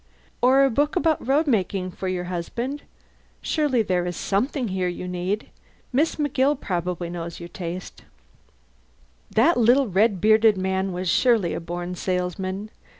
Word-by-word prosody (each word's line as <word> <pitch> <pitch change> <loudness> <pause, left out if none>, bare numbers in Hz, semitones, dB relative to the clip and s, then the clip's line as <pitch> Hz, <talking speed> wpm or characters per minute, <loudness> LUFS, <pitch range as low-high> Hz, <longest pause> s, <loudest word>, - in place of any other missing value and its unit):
Or 265 +2 +5
a 270 - +1
book 290 +6 +1
about 325 -7 +1
road 290 +4 +3
making 195 - 0
for 190 - -5
your 185 -1 -2
husband? 235 +11 -4 0.6
Surely 285 -7 +1
there 180 -3 0
is 175 - -4
something 240 +4 -1
here 185 -1 -1
you 180 +1 -4
need? 180 +4 -3 0.4
Miss 300 +6 +2
McGill 290 -1 +1
probably 175 -1 -3
knows 170 -1 -6
your 170 0 -8
tastes." 180 0 -7 1.3
That 300 +11 +3
little 245 +3 +4
red 200 +1 +2
bearded 215 +1 +5
man 190 0 -1
was 180 +1 -4
surely 220 -3 +3
a - - -3
born 175 +1 -5
salesman. 185 +3 -3
195 Hz, 150 wpm, -24 LUFS, 180-255 Hz, 1.3 s, Or